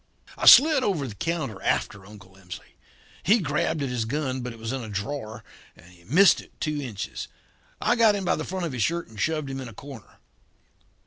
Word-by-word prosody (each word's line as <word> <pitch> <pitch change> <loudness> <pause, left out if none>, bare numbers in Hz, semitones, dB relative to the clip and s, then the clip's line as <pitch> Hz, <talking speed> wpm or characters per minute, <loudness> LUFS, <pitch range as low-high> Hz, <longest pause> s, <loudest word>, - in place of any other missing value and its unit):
"I - - -2
slid 295 +1 +9
over 175 - 0
the 115 - -7
counter 135 - -3
after 100 -1 -2
Uncle 100 -3 -15
Emsley. 90 -4 -11 0.5
He 205 +8 +4
grabbed 150 -3 -1
at 135 - -2
his 120 -3 -2
gun, 130 +1 -2
but 125 0 -5
it 115 - -11
was 115 +1 -5
in 135 -1 -3
a 110 - -8
drawer, 110 +1 -5 0.3
and - - -18
he 85 -1 -20
missed 180 - +5
it - - -21
two 150 -2 -2
inches. 115 -8 -6 0.5
I 240 - +2
got 225 -3 +4
him 195 -2 -4
by - - +2
the 155 - -4
front 185 0 -4
of 165 - -4
his 125 - -3
shirt 170 +9 -1
and 110 -2 -8
shoved 155 -3 -1
him 135 0 -5
in 130 - -7
a 115 - -11
corner. 135 -1 -12
135 Hz, 215 wpm, -25 LUFS, 110-165 Hz, 0.5 s, slid